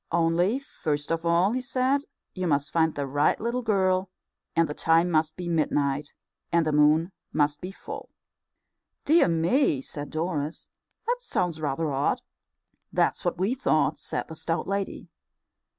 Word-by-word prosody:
Only, 170 +6 +2
first 150 - -3
of 165 0 -1
all, 175 +5 +3
he 255 - -1
said, 260 +3 +1 0.3
you 185 -1 -2
must 145 -2 0
find 160 -1 +2
the 145 - -2
right 145 +2 +2
little 235 +2 -1
girl, 190 -4 +1 0.5
and 165 -1 +4
the 150 - -4
time 165 +3 +3
must 155 -1 +1
be 180 -1 -5
midnight, 145 -3 0 0.4
and 170 -1 +3
the 155 - +1
moon 150 +4 +4 0.2
must 145 -1 +1
be 180 - -5
full." 195 - -8 1.0
"Dear 325 +4 +5
me!" 170 - +2
said 145 +2 -6
Doris, 155 -1 -3 0.4
"that 485 +2 +1
sounds 180 - -2
rather 150 +1 -1
odd." 140 +1 0 0.7
"That's - - +1
what 175 -1 -1
we 195 +7 +1
thought," 250 -12 +1
said - - -3
the 160 - -8
stout 165 +2 -2
lady. 195 0 -3
165 Hz, 155 wpm, -26 LUFS, 150-190 Hz, 1.0 s, Dear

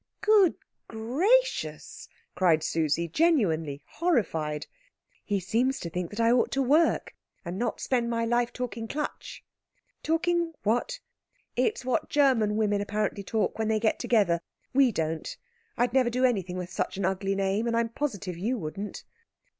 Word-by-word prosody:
"Good 420 -5 +5 0.3
gracious!" 340 - 0 0.2
cried 165 -4 +3
Susie, 165 +1 0
genuinely 165 - +1
horrified. 165 - -1 0.6
"He 205 -2 -1
seems 240 +9 0
to 170 - -6
think 180 0 -3
that 210 - -8
I 230 0 +4
ought 245 0 +3
to 275 - +1
work, 305 +6 +2 0.3
and 175 +3 -4
not 240 -1 -1
spend 240 -3 0
my 230 -1 0
life 240 +1 +1
talking 235 -2 -5
Klatsch." 295 +5 -5 0.6
"Talking 335 +1 0
what?" 245 - 0 0.6
"It's 430 - 0
what 255 -2 0
German 255 -8 +3
women 205 -2 +1
apparently 205 0 -2
talk 215 +2 -1
when 220 - 0
they 220 0 +1
get 220 0 +1
together. 195 -8 +2 0.3
We 265 -2 +5
don't. 160 -4 -3 0.4
I'd 245 0 +1
never 260 -2 +3
do 250 +2 +1
anything 190 -7 0
with 180 0 -5
such - - -2
an 195 - -1
ugly 195 +1 0
name, 195 +3 0
and 230 0 +1
I'm 230 0 +1
positive 220 - -3
you 220 +9 -1
wouldn't." 195 +3 -6
225 Hz, 155 wpm, -27 LUFS, 190-255 Hz, 0.6 s, Good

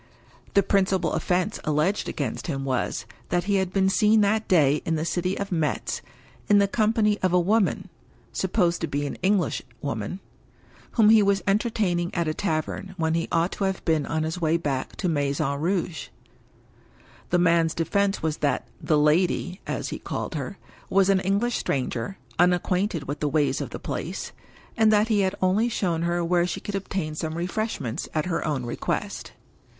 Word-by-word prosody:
The 200 - +6
principal 190 -3 +1
offense 185 +4 0
alleged 155 +6 0
against 135 -7 -3
him 135 -4 -2
was, 130 -3 -1 0.2
that 175 0 +1
he 200 +1 +1
had 190 -1 0
been 190 0 +2
seen 215 +2 +4
that 215 +2 +1
day 150 -5 +4
in 165 - 0
the 155 +1 -1
city 180 +2 -1
of 200 0 -4
Metz, 160 -5 -1 0.5
in 205 - +6
the 200 0 +4
company 215 0 +2
of 185 -1 +1
a 180 - +5
woman 200 +4 +1 0.5
(supposed 180 -2 +1
to 165 - 0
be 145 0 -2
an 140 - -3
Englishwoman), 145 - -1 0.7
whom 220 -3 +5
he 220 -1 +7
was 200 -1 +2
entertaining 195 -4 +1
at 170 -2 0
a 155 - 0
tavern, 185 +2 -3
when 160 -1 +1
he 165 0 0
ought 170 +1 +2
to 200 - -2
have 190 -1 -2
been 160 -4 +1
on 160 0 -1
his 160 +3 -3
way 160 0 +3
back 140 -5 -3
to. 185 - -2
Maison 140 -2 0
Rouge. 175 -1 -1 1.2
The 180 - +3
man's 165 -2 +3
defense 200 +4 0
was 155 -1 0
that 135 -5 0
"the 155 - +2
lady" 175 +4 +2
(as - - -3
he - - -5
called - - -4
her) - - -4 0.3
was 195 0 +4
an 195 -1 +4
English 200 +6 0
stranger, 130 +4 -2 0.2
unacquainted 180 -1 +2
with 145 +2 -5
the 150 - 0
ways 145 0 +1
of - - -4
the - - -6
place, - - -5 0.4
and 220 -1 +4
that 215 +1 +3
he 215 -2 +3
had 190 0 +1
only 205 +6 +3
shown 175 -7 -1
her 170 0 0
where 175 0 +2
she - - -3
could 205 - -6
obtain 190 -5 -3
some 155 +1 -4
refreshments 175 - -3
at 155 - +1
her 175 -2 -1
own 135 -5 -1
request. 120 - -3
175 Hz, 180 wpm, -25 LUFS, 155-195 Hz, 1.2 s, he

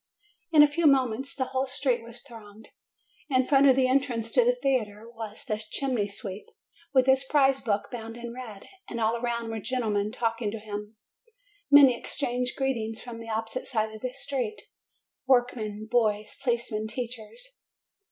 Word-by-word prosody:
In 305 -2 +8
a - - +7
few 310 +2 +2
moments 265 -2 +2
the 265 -2 -1
whole 265 +1 -1
street 260 -3 0
was 235 +1 -8
thronged. 220 -4 -13 0.6
In 255 -2 +3
front 275 0 +5
of 260 - +6
the 260 -1 +3
entrance 250 -4 0
to - - +5
the - - +3
theatre 230 - -1
was 225 +2 -8
the 215 -5 -2
chimney 250 -7 -1
sweep, 200 0 -6 0.4
with 260 -2 +4
his 265 0 +4
prize 270 -1 +3
book 205 -4 -1
bound 225 -1 -7
in 235 0 -7
red, 230 -6 -9 0.3
and 235 - -4
all 225 +1 +2
around 235 -1 -2
were 225 - -3
"gentlemen 215 -3 -1
talking 230 -2 -1
to 220 - -5
him. 210 0 -7 0.7
Many 280 -3 +8
exchanged 250 0 -2
greetings 235 -5 -1
from 240 -2 -8
the 230 0 -9
opposite 225 +3 -3
side 220 -3 -1
of 215 - -10
the 255 - -3
street, 275 - -3 0.6
work 250 -1 +4
men, 215 -2 -5
boys, 215 -3 +1
policemen, 235 -4 -1
teachers. 250 - -7
240 Hz, 170 wpm, -27 LUFS, 220-265 Hz, 0.7 s, In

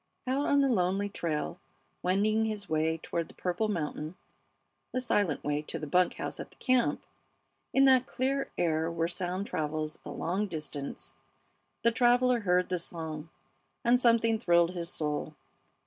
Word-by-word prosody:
Out 270 +3 0
on 285 0 +4
the 275 - +4
lonely 195 -3 +1
trail 155 - -3 0.4
wending 215 +4 +2
his 210 -2 -3
way 160 +1 +1
toward 165 0 -3
the - - -15
purple 180 +4 -1
mountain 155 -3 -3 0.8
the 255 - +1
silent 205 - +1
way 145 0 0
to 150 - -5
the - - -5
bunk 180 +5 +2
house - - -4
at - - -6
the - - -21
camp 255 -2 +2 0.7
in 270 0 +5
that 260 -1 +5
clear 270 +2 -1
air 160 -1 +1
where 165 -1 0
sound 180 +2 -3
travels 155 -3 -2
a - - -8
long 190 +5 -1
distance 150 -5 -5 0.7
the 235 - +5
traveler 245 +1 +4
heard 180 -3 +2
the 180 -1 0
song, 160 -2 -6 0.6
and 245 +1 +5
something 230 -2 +4
thrilled 170 -4 +4
his 170 -2 -4
soul. 150 -1 -2
180 Hz, 160 wpm, -30 LUFS, 160-230 Hz, 0.8 s, in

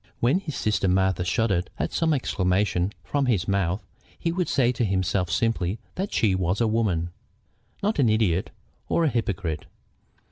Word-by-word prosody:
When 130 +10 +3
his 155 -8 -6
sister 105 -4 +1
Martha 95 -1 +2
shuddered 95 -1 +1
at - - -2
some 165 -1 +2
exclamation 95 - +1
from 140 -2 0
his 105 -6 +1
mouth, 95 -1 0 0.3
he 165 - -1
would 180 0 -1
say 125 -3 +3
to 120 -1 -1
himself 95 -2 0
simply 95 +1 0 0.2
that 195 +3 -3
she 105 -4 +2
was 95 +1 0
a 115 - +3
woman, 95 -7 0 0.7
not 210 -4 +1
an 125 -5 +4
idiot 105 -5 +2 0.4
or 170 - +2
a - - +3
hypocrite. 100 - -2
105 Hz, 165 wpm, -25 LUFS, 90-120 Hz, 0.7 s, an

